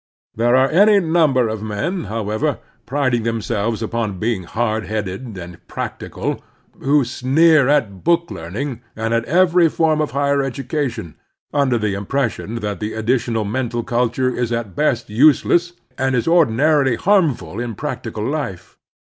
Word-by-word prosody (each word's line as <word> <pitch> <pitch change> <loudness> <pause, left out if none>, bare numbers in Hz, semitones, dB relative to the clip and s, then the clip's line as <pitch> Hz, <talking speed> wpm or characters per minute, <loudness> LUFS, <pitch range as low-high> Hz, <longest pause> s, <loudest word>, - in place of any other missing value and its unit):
There 120 +2 +3
are 130 +1 +3
any 205 +5 +5
number 160 -8 +2
of 110 -1 -4
men, 145 - -3
however, 110 +6 -2 0.3
priding 130 -3 +1
them 115 0 -1
selves 110 +1 -2
upon 110 -3 -2
being 105 -2 -2
"hard 110 +2 -1
headed" 105 +1 -4
and 90 -1 -10
"prac - - -5
tical" - - -4 0.4
who 140 0 +2
sneer 140 +4 +3
at 120 -10 +1
book 170 0 +2
learning 115 - -5
and 115 +1 -2
at 115 0 +1
every 175 +2 +4
form 155 -1 +1
of 150 - -1
higher 140 0 +1
education, 135 - -3 0.4
under 140 -4 +2
the 105 -3 -1
impression 115 +2 -2
that 105 -3 -3
the 105 +1 -4
additional 115 -1 0
mental 120 +1 -2
culture 125 +1 0
is 120 -1 -2
at 115 -5 -3
best 130 -6 0
useless, 155 +7 +3 0.3
and 130 0 +1
is 115 - 0
ordinarily 145 -4 +3
harmful 150 - +1
in 120 -2 -4
practical 105 +2 -5
life. 135 - -5
120 Hz, 150 wpm, -19 LUFS, 110-145 Hz, 0.4 s, any